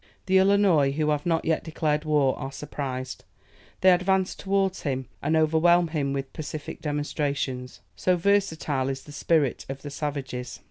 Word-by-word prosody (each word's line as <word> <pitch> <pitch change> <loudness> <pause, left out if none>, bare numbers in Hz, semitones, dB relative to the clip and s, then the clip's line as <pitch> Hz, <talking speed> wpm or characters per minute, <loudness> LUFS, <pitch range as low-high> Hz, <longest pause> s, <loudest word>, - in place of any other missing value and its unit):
The 190 0 +4
Illinois, 190 -7 +4
who 150 +1 +1
have 150 +2 -1
not 165 -1 +1
yet 160 - +1
declared 155 -1 -1
war, 145 -4 +2
are 135 - -5
surprised. 130 -3 -5 0.6
They 185 - +7
advance 185 +1 +2
towards 195 -1 0
him, 130 -3 -2 0.2
and 155 +3 +1
overwhelm 165 +2 +4
him 145 -4 -1
with 135 -1 -4
pacific 150 -1 -6
demonstrations. 145 -4 -3
So 180 -1 +1
versatile 160 -8 +1
is 135 0 -4
the 150 - -12
spirit 145 -2 +1
of 135 0 -6
the 145 - -6
savages! 135 -4 -4
150 Hz, 155 wpm, -26 LUFS, 140-175 Hz, 0.6 s, They